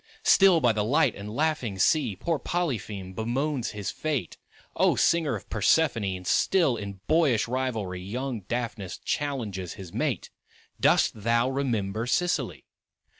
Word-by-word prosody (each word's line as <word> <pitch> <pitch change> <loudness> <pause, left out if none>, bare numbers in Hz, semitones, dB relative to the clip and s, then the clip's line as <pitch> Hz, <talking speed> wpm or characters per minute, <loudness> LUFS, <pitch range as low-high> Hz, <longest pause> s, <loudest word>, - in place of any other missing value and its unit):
Still 190 -4 +6
by 120 - +4
the 105 -1 0
light 145 +9 +3
and 100 +1 -8
laughing 125 -5 -1
sea 110 - +2
Poor 160 - -1
Polypheme 110 - -3
bemoans 125 +5 -1
his 105 -2 -4
fate; 145 - -3 0.4
O - - +3
Singer 165 -4 +2
of - - -8
Persephone! 150 -9 +2
And 90 0 -9
still 165 - +3
in 100 -3 -7
boyish 150 -10 +3
rivalry 115 -8 -2
Young 120 +5 -4
Daphnis 115 -6 -3
challenges 110 - -3
his 95 -3 -10
mate; - - -2 0.5
Dost - - +4
thou 115 +4 +2
remember 115 -5 -1
Sicily? 175 +7 -1
120 Hz, 135 wpm, -27 LUFS, 100-145 Hz, 0.5 s, Still